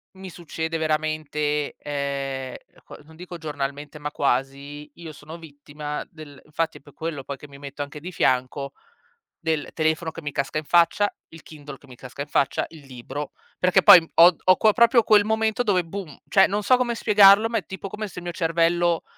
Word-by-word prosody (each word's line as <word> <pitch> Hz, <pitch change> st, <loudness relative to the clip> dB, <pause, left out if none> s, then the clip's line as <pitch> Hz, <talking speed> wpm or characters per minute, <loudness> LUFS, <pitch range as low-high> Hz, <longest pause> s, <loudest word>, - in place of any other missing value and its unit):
mi 190 Hz, 0 st, -9 dB
succede 165 Hz, -1 st, -5 dB
veramente, 155 Hz, -1 st, -2 dB
ehm, 140 Hz, -2 st, -4 dB, 0.3 s
co -, -, -12 dB
non 160 Hz, +1 st, -18 dB
dico 175 Hz, 0 st, -9 dB
giornalmente, 145 Hz, -1 st, -6 dB
ma 150 Hz, 0 st, -4 dB
quasi, 140 Hz, +3 st, -2 dB
io 165 Hz, -2 st, -10 dB
sono 155 Hz, +2 st, -11 dB
vittima 150 Hz, -1 st, -8 dB
del 150 Hz, -3 st, -13 dB
infatti 160 Hz, +2 st, -3 dB
è -, -, -30 dB
pe' 145 Hz, 0 st, -18 dB
quello 160 Hz, -4 st, -5 dB
poi 140 Hz, 0 st, -7 dB
che 145 Hz, -, -13 dB
mi 140 Hz, -1 st, -14 dB
metto 140 Hz, 0 st, -8 dB
anche 145 Hz, +1 st, -10 dB
di 180 Hz, +5 st, -8 dB
fianco 130 Hz, -2 st, 0 dB, 0.7 s
del 160 Hz, -3 st, -2 dB
telefono 160 Hz, +1 st, -1 dB
che 165 Hz, -, -10 dB
mi 145 Hz, -1 st, -5 dB
casca 140 Hz, +2 st, -2 dB
in 155 Hz, -, -3 dB
faccia, 175 Hz, +5 st, +3 dB, 0.2 s
il 165 Hz, -1 st, -14 dB
Kindle 145 Hz, -3 st, -11 dB
che 140 Hz, -, -21 dB
mi 125 Hz, -, -13 dB
casca 130 Hz, +3 st, -10 dB
in 145 Hz, -, -5 dB
faccia, 140 Hz, -, 0 dB
il 155 Hz, -4 st, -15 dB
libro, 135 Hz, +3 st, -7 dB, 0.3 s
perché 180 Hz, -1 st, +3 dB
poi 180 Hz, -6 st, +8 dB
ho 170 Hz, +1 st, +7 dB
ho 185 Hz, 0 st, +5 dB
que 215 Hz, -1 st, +4 dB
proprio 235 Hz, 0 st, +4 dB
quel 210 Hz, -1 st, +5 dB
momento 220 Hz, +2 st, 0 dB
dove 190 Hz, -5 st, +1 dB
boom, 175 Hz, -4 st, -8 dB
cioè 195 Hz, -1 st, +5 dB
non 205 Hz, +1 st, -2 dB
so 255 Hz, -, +5 dB
come 240 Hz, -2 st, -1 dB
spiegarlo, 205 Hz, 0 st, +6 dB
ma 230 Hz, -, 0 dB
è -, -, -14 dB
tipo 190 Hz, 0 st, -7 dB
come 210 Hz, +2 st, -6 dB
se 180 Hz, -, -9 dB
il -, -, -12 dB
mio 175 Hz, -, -4 dB
cervello 170 Hz, 0 st, +1 dB
155 Hz, 200 wpm, -23 LUFS, 145-180 Hz, 0.7 s, poi